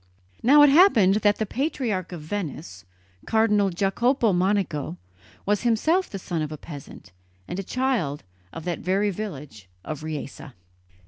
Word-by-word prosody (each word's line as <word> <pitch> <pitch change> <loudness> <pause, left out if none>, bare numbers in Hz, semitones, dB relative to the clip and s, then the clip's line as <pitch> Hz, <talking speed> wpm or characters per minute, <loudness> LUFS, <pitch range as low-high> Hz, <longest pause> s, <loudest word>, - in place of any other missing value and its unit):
Now 290 +4 +7
it 290 - +7
happened 240 - +5
that 205 -1 +3
the 220 - -1
patriarch 230 - -2
of 175 -3 -7
Venice, 155 - -6 0.4
Cardinal 210 -3 +3
Jacopo 210 +5 +1
Monico, 180 - 0 0.5
was 205 0 +1
himself 310 - +1
the 195 - -6
son 175 -3 -4
of 155 -1 -3
a 155 - -6
peasant, 140 -9 -11 0.4
and 180 - -5
a - - -3
child 230 - -1 0.3
of 165 - -8
that 175 -2 -2
very 195 +3 0
village 150 - -8 0.2
of 155 -1 -5
Riese. 155 -3 -6
195 Hz, 145 wpm, -24 LUFS, 155-225 Hz, 0.5 s, Now